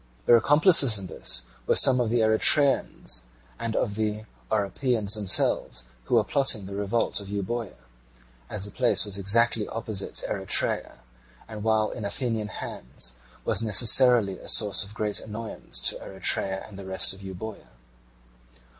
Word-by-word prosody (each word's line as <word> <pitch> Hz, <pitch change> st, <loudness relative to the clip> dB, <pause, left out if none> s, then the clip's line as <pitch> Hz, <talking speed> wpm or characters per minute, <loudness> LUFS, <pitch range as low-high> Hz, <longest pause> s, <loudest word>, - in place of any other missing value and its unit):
Their 120 Hz, -, +5 dB
accomplices 145 Hz, -, +4 dB
in 100 Hz, -, -7 dB
this 90 Hz, -, +1 dB, 0.2 s
were -, -, +1 dB
some 130 Hz, -1 st, +6 dB
of 120 Hz, -3 st, -1 dB
the 120 Hz, 0 st, 0 dB
Eretrians 130 Hz, -, +2 dB, 0.3 s
and 115 Hz, -1 st, -5 dB
of 105 Hz, -, -2 dB
the 110 Hz, 0 st, -4 dB, 0.2 s
Oropians 110 Hz, +1 st, 0 dB
themselves, 95 Hz, -, 0 dB, 0.2 s
who -, -, -1 dB
were 115 Hz, -, +3 dB
plotting 120 Hz, -3 st, -2 dB
the 100 Hz, -, -10 dB
revolt 100 Hz, +4 st, -2 dB
of 100 Hz, -, -10 dB
Euboea, 100 Hz, -, -6 dB, 0.7 s
as 100 Hz, -1 st, -3 dB
the 105 Hz, -, -8 dB
place 105 Hz, -6 st, +1 dB
was 100 Hz, -1 st, -2 dB
exactly 115 Hz, +2 st, +2 dB
opposite 110 Hz, -3 st, -4 dB
Eretria, -, -, -1 dB, 0.5 s
and 110 Hz, -2 st, -10 dB
while 110 Hz, -1 st, 0 dB
in -, -, -9 dB
Athenian 110 Hz, +1 st, -3 dB
hands 60 Hz, -, -2 dB, 0.3 s
was -, -, +1 dB
necessarily 115 Hz, -1 st, +5 dB
a -, -, -14 dB
source 105 Hz, -1 st, +5 dB
of 100 Hz, +1 st, -11 dB
great 105 Hz, -2 st, -3 dB
annoyance 110 Hz, -, -7 dB
to -, -, -7 dB
Eretria 95 Hz, 0 st, -2 dB
and 100 Hz, -2 st, -14 dB
the 95 Hz, -, -10 dB
rest 95 Hz, 0 st, +1 dB
of 95 Hz, -, -14 dB
Euboea. 100 Hz, +2 st, -10 dB
105 Hz, 150 wpm, -24 LUFS, 100-115 Hz, 0.7 s, some